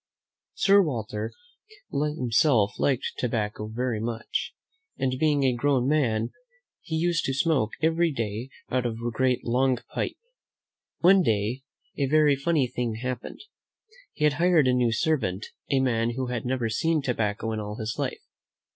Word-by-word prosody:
Sir 200 0 +5
Walter 110 - -3 0.6
himself 130 -6 +2
liked 130 -3 0
tobacco 105 -3 -2
very 115 0 -2
much, 115 0 -3 0.4
and, 130 -1 0
being 150 -2 +2
a 130 -2 +3
grown 130 0 +1
man, 120 -7 +1 0.5
he 160 - -4
used 165 +1 +1
to 135 - -1
smoke 140 -7 +1
every 165 +1 +3
day 115 -1 -3 0.2
out 125 -1 +1
of 115 - -3
a 120 +1 -3
great, 125 +1 0
long 125 +2 +2 0.2
pipe. - - -2 0.8
One 190 +2 +6
day 110 - 0 0.4
a 140 - +2
very 150 0 +4
funny 145 0 +1
thing 120 -2 -3
happened. 125 +1 -5 0.7
He 150 - -4
had 150 -1 +4
hired 175 -6 +4
a 130 - +4
new 125 -2 +2
servant, 115 - 0 0.2
a 135 - +3
man 120 -2 +1
who 130 0 -2
had 125 -2 -3
never 125 -2 0
seen 150 +8 0
tobacco 110 -3 -1
in 110 - -2
all 105 0 -5
his 110 0 -4
life. - - -3
125 Hz, 155 wpm, -26 LUFS, 115-150 Hz, 0.8 s, One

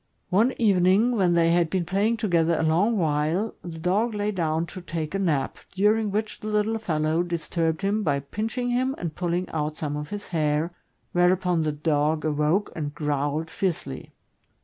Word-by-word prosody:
One 225 +8 +3
evening, 200 +1 +4
when 185 -5 +3
they 165 0 +4
had 170 -1 +3
been 180 0 -1
playing 200 +6 +1
together 170 -6 +2
a - - 0
long 185 +9 +2
while, 160 +5 0
the 170 -2 -7
dog 200 +7 0
lay 205 0 0
down 165 -4 0
to 185 - -9
take 165 -2 -4
a 195 - -1
nap, 160 -8 0
during 210 +3 +2
which 215 +2 -2
the 215 - -7
little 215 +1 +1
fellow 160 -4 0
disturbed 165 0 -1
him 205 +2 +1
by 145 -7 0
pinching 225 - -3
him 255 +2 +1
and 170 -3 -4
pulling 175 +2 -1
out 155 0 -2
some 145 -2 -3
of 150 0 -5
his 205 0 -6
hair, 155 0 0 0.4
whereupon 180 -1 +2
the 155 -1 0
dog 150 +1 0
awoke 155 +6 +1
and 145 -2 -4
^growled 145 +1 -1
fiercely. 175 - -3
175 Hz, 175 wpm, -25 LUFS, 155-205 Hz, 0.4 s, evening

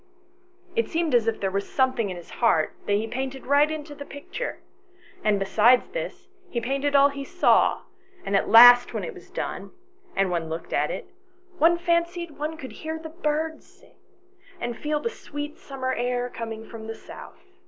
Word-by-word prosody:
It 460 - +1
seemed 330 -3 0
as 235 -2 +4
if 225 - 0
there 195 -1 -1
was 200 +1 -3
something 260 -5 +1
in 180 - -5
his 175 - -12
heart 165 -10 +3
that 205 - +2
he 210 +2 +1
painted 265 +3 -5
right 285 +2 +4
into 305 -1 -6
the 285 - -8
picture, 285 - -6 0.7
and 210 -1 +3
besides 215 +5 +4
this, - - -6 0.2
he 240 - -2
painted 275 +4 -1
all 280 0 +7
he 280 0 -6
saw, 360 +6 +3 0.4
and 200 - 0
at 195 - +1
last 245 +2 +9
when - - -2
it 480 - -5
was - - -14
done, - - -5 0.5
and 195 -2 +1
one 165 -2 -2
looked 160 +1 -6
at - - +1
it, - - -5 0.5
one 335 +2 +5
fancied 340 0 0
one 310 +2 -3
could 265 -5 -8
hear 315 0 -5
the 320 0 -8
birds 315 0 -2
sing, - - -23 0.7
and 240 -4 -3
feel 300 +3 -1
the 300 - -3
sweet 290 -6 -7
summer 260 -2 -3
air 245 0 -1
coming 225 -1 -6
from 220 -1 -9
the 225 - -5
south. - - -12
265 Hz, 185 wpm, -25 LUFS, 225-305 Hz, 0.7 s, last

